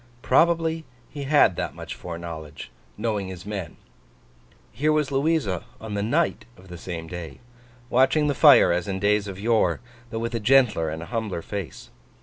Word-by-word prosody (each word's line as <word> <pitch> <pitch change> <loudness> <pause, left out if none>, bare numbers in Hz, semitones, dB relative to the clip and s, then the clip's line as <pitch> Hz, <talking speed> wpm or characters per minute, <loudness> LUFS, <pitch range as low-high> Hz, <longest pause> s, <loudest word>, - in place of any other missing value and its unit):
Probably 165 +2 +2 0.3
he 145 -2 -6
had 140 - +4
that - - -3
much - - -7
foreknowledge, 85 -3 -8 0.3
knowing 105 -4 -2
his 95 -1 -8
men. 100 -5 -5 0.9
Here 150 +3 +1
was 150 -2 +1
Louisa 140 - 0
on 110 -1 -7
the 100 - -1
night 150 +11 0
of 95 +1 -17
the 90 - -8
same 85 -3 -6
day, 85 -1 -8 0.5
watching 130 +5 +3
the 145 - +1
fire - - +7
as 85 +2 -1
in 95 -1 -2
days 105 +1 +2
of 95 -1 -7
yore, 105 -6 +2 0.3
though 115 - -5
with 115 +1 -3
a 115 - -1
gentler 115 -8 +3
and 80 +1 -5
a 105 - -11
humbler 110 -7 -2
face. 100 -9 -7
105 Hz, 170 wpm, -24 LUFS, 90-135 Hz, 0.9 s, fire